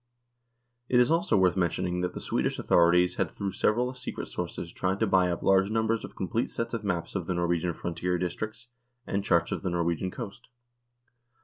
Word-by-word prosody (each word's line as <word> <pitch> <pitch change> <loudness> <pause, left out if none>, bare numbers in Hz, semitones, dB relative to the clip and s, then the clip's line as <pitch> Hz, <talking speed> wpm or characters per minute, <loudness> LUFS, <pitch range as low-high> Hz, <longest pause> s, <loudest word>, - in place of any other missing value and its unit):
It 125 - +4
is 125 +4 +4
also 165 -10 +3
worth 90 -2 +4
mentioning 90 0 0
that 90 0 -2
the - - -4
Swedish - - -1
authorities 90 +1 +4
had 95 -4 +1
through 100 +2 -4
several 120 +6 +1
secret 125 - -6
sources 85 -1 -5
tried 95 +2 -1
to - - +3
buy 95 -1 +3
up 85 - -3
large 95 0 +4
numbers 110 0 0
of - - -9
complete 110 +5 -1
sets 115 0 -4
of 115 -2 -3
maps 90 -5 -2
of 90 -4 -3
the 90 - -1
Norwegian 85 -1 0
frontier 90 +1 -2
districts 110 +6 -4 0.4
and 100 0 -1
charts 85 -4 +2
of - - -2
the 95 - -1
Norwegian 85 +1 0
coast. 100 +2 -8
95 Hz, 190 wpm, -28 LUFS, 85-110 Hz, 0.4 s, It